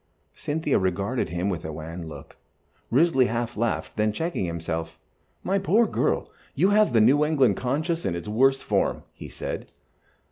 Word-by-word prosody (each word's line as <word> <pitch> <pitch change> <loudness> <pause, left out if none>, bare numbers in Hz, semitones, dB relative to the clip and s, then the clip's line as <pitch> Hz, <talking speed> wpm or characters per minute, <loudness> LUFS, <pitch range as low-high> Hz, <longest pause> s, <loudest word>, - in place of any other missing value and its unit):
Cynthia 150 -1 -1
regarded 100 +7 -1
him 90 +2 -2
with 90 -5 -2
a 80 - -5
wan 80 +2 -7
look. 75 -3 -11 0.5
Risley 135 -1 +4
half 120 +1 -2
laughed, 115 +1 -2
then 105 0 +2
checked 165 +9 -3
himself. 80 -4 -3 0.5
"My 195 +2 +1
poor 205 +5 +3
girl, - - -1 0.2
you 195 - +3
have 210 -8 +4
the 115 - +5
New 135 +7 +5
England 135 -9 +3
conscience 155 +6 -1
in 85 - -1
its 85 +2 -6
worst 135 +5 +2
form," - - 0
he - - -10
said. - - -6
120 Hz, 165 wpm, -25 LUFS, -, 0.5 s, the